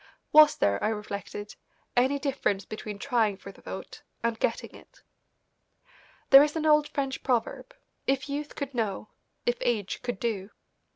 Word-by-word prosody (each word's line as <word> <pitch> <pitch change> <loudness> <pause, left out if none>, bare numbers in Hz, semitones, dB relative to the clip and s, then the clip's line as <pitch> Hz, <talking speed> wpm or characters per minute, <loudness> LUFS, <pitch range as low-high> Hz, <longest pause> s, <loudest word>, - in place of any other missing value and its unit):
Was 305 0 +8
there, 100 0 +1
I - - +3
reflected, 205 -1 -5 0.4
any 260 +3 +3
difference 265 -8 -1
between 215 -1 -6
trying 225 -4 +1
for 200 - -10
the - - -19
vote - - -8 0.2
and 230 -1 0
getting - - -1
it? - - -17 1.3
There 270 0 +11
is 300 +1 +1
an 315 -1 -1
old 300 -1 +5
French 270 -3 -3
proverb, 255 - -1 0.3
"If 270 0 +1
youth 290 +1 -4
could 280 -2 -5
know; 215 -3 -2 0.4
if 240 0 +1
age 215 -5 -1
could 245 -6 -4
do." 210 -4 -2
245 Hz, 155 wpm, -28 LUFS, 210-280 Hz, 1.3 s, There